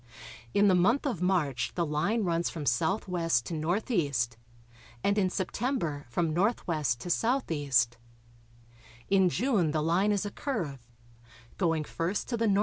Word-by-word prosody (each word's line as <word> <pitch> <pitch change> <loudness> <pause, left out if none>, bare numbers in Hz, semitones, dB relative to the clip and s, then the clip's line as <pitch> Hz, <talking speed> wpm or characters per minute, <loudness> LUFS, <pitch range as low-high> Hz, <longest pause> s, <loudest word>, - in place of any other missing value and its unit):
In 205 0 +5
the 190 - +5
month 205 - +3
of 235 - -2
March 150 -10 0
the 170 - +1
line 165 +10 0
runs 170 -2 0
from 160 - -6
S.W. 170 - 0
to 170 - -6
N.E., 170 - 0 0.9
and 200 - +2
in 190 -2 +2
September 185 - -2
from 165 +5 0
N.W. 195 +9 +2 0.4
to 125 - -9
S.E. 170 - -1 1.4
In 190 -2 +5
June 210 - +1
the 150 0 0
line 180 +6 +2
is 205 0 0
a 205 - -4
curve, 155 - -4 0.7
going 165 -4 +1
first 170 +6 -2
to 235 - -1
the 230 - +1
N.E. 200 -2 +3
180 Hz, 145 wpm, -29 LUFS, 160-205 Hz, 1.4 s, In